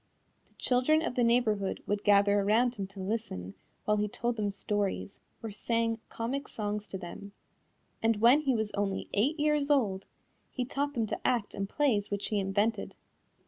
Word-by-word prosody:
The - - -33
children 270 +6 +2
of 330 - -2
the 245 - +1
neighborhood 225 -5 +1
would 205 0 -1
gather 205 0 +5
around 225 +5 +3
him 200 -5 -5
to 195 0 -12
listen 190 - -3 0.3
while 210 0 +2
he 210 0 +1
told 235 +3 -2
them 210 -2 -1
stories 200 0 -2 0.2
or 225 - -4
sang 230 +2 0
comic 260 +5 -3
songs 210 -1 -3
to 190 - -5
them, 195 +2 -9 0.7
and 225 0 +3
when 240 +7 +6
he 270 -4 +1
was 220 -2 -1
only 200 -1 -2
eight 275 +10 +1
years 300 -1 +2
old 210 -10 +1 0.4
he 250 - -3
taught 285 +3 -2
them 230 -2 +1
to - - -4
act 235 -5 0
in 195 0 -3
plays 215 -5 +1
which 200 0 -2
he 210 - +1
invented. 205 +4 0
215 Hz, 180 wpm, -30 LUFS, 200-245 Hz, 0.7 s, when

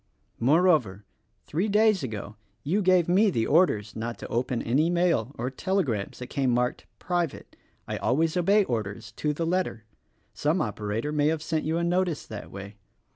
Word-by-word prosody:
Moreover, 135 - +3 0.4
three 175 +8 -1
days 215 -2 +3
ago 110 -4 -5 0.3
you 190 +8 +1
gave 185 -3 +4
me 185 - +3
orders 110 - +2
not 115 +1 -4
to - - -8
open 120 0 -1
any 145 +8 +2
mail 170 -8 +1
or 125 +3 -3
telegrams 135 - -1
that 125 - -6
came 135 +1 -1
marked 125 0 0
"Private" 175 -4 -3 0.2
— - - -41
I - - -3
always 160 +5 +1
obey 200 +4 +4
orders, 110 - -4
to 150 - 0
the 165 +3 -2
letter. 170 -10 -1 0.5
Some 155 +5 0
operator 105 +2 -2
may 150 -1 +2
have 160 0 0
sent 160 -1 -1
you 160 +2 0
a 170 - 0
notice 175 -2 0
that 110 -2 -8
way. 100 +1 -9
150 Hz, 170 wpm, -27 LUFS, 115-175 Hz, 0.5 s, gave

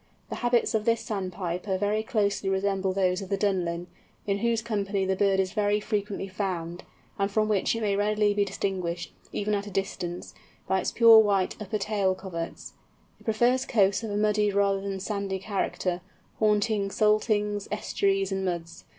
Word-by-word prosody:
The - - -4
habits 240 -1 +1
of 220 -1 +1
this 230 -1 +2
Sandpiper 185 -2 -3
very 205 +2 0
closely 205 -4 0
resemble 195 0 0
those 185 0 +1
of 190 - -7
the 200 - 0
Dunlin, 175 -4 0 0.4
in 200 0 0
whose 230 0 +1
company 200 -3 -1
the 190 0 +1
bird 195 0 +2
is 190 -1 0
very 210 0 +2
frequently 205 -2 -3
found, 180 -3 -4 0.4
and 195 0 +1
from 215 +1 +1
which 210 +1 +1
it 230 - -3
may 205 -2 +1
readily 210 0 +2
be 205 0 +2
distinguished, 185 -3 -3 0.2
even 210 +1 -1
at 205 0 -1
a - - -5
distance, 180 -2 -4 0.3
by 190 - +2
its - - -2
pure 230 -2 +8
white 200 -3 +2
upper 210 +1 -2
tail 200 -2 0
coverts. 170 -3 -6 0.5
It - - -21
prefers 240 +4 +2
coasts 200 -5 +2
of 225 - -5
a 205 - -2
muddy 210 0 +2
rather 200 -1 +2
than 200 0 -3
a 190 - -5
sandy 200 -1 -2
character, 190 -2 -2 0.4
haunting 210 -1 +2
saltings, 210 -1 +1
estuaries, 195 -2 0
and 190 0 -1
muds. 170 -2 -4
200 Hz, 175 wpm, -27 LUFS, 190-210 Hz, 0.5 s, pure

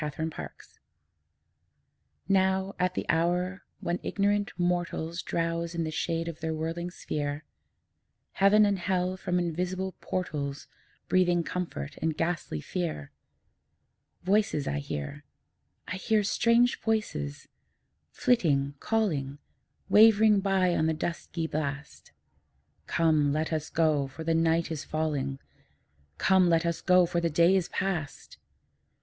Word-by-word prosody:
TWILIGHT 155 +2 -3
VOICES - - -10 1.5
Now, 190 0 +2
at 180 0 +1
the - - -2
hour 180 +3 0 0.2
when 175 +1 -1
ignorant 205 0 0
mortals 175 -1 -1
Drowse 165 0 -2
in 170 - 0
the 155 - -3
shade 165 +1 -2
of 165 -2 -6
their 160 -1 -2
whirling 165 +2 -3
sphere, 145 -3 -4 0.9
Heaven 205 +2 +5
and 200 -2 +1
Hell 185 0 0
from 180 -1 -2
invisible 180 +2 -2
portals 145 -6 -3 0.4
Breathing 175 -2 +3
comfort 165 - -5
and 160 -1 -1
ghastly 165 - -2
fear, 165 - -4 1.1
Voices 195 -6 +1
I 70 - -1
hear; 75 - -5 0.6
I 185 - -4
hear 215 +2 +1
strange 235 +4 +3
voices, 210 - -2 0.6
flitting, 145 - +1
calling, 155 -12 -1 0.5
Wavering 215 -1 +6
by 190 -2 +2
on 160 - +2
the 160 - +1
dusky 165 +1 -3
blast, 145 -2 -5 0.8
'Come, 155 -3 +2
let 155 +2 -1
us 155 0 -2
go, 155 -4 +2
for 150 +4 -8
the 165 +1 +1
night 165 0 +2
is 155 -2 -4
falling; 145 -4 -2 0.8
Come, 190 -2 +4
let 165 0 +3
us 170 -1 -1
go, 180 -1 +5
for 170 0 -1
the 170 - +1
day 170 +4 +4
is 185 -3 0
past!' 175 -8 -4
170 Hz, 125 wpm, -28 LUFS, 155-185 Hz, 1.5 s, Wavering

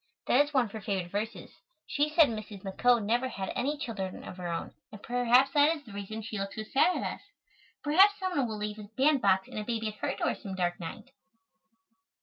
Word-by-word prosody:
That 270 +4 +5
is 290 - -9
one 260 -4 +3
of 210 - -10
her 220 - -7
favorite 190 -3 -2
verses. 215 +3 -4 0.3
She 295 +1 0
said 310 0 +6
Mrs. 215 -3 -7
McCoe 225 +3 +2
never 240 +4 +1
had 195 -5 -4
any 285 +5 -1
children 200 -9 -5
of 185 - -9
her 180 -1 -5
own 170 -1 -4 0.2
and 210 -1 -11
perhaps 245 +2 +4
that 300 +2 +4
is 295 - -15
the 225 -6 -13
reason 205 +2 -6
she 215 -1 -5
looks 195 0 -4
so 220 - -4
sad 275 +11 +3
at - - -3
us. - - -22 0.6
Perhaps 380 +7 +5
some 375 -2 -2
one 270 -4 +2
will 220 -1 -4
leave 210 0 -4
a 205 -1 -10
bandbox 250 -10 +3
and - - -6
a - - -3
baby 225 -1 -2
at - - -8
her - - -2
door - - 0
some 195 -2 -7
dark 175 -1 -1
night. 175 +9 -8
220 Hz, 225 wpm, -30 LUFS, 200-275 Hz, 0.6 s, said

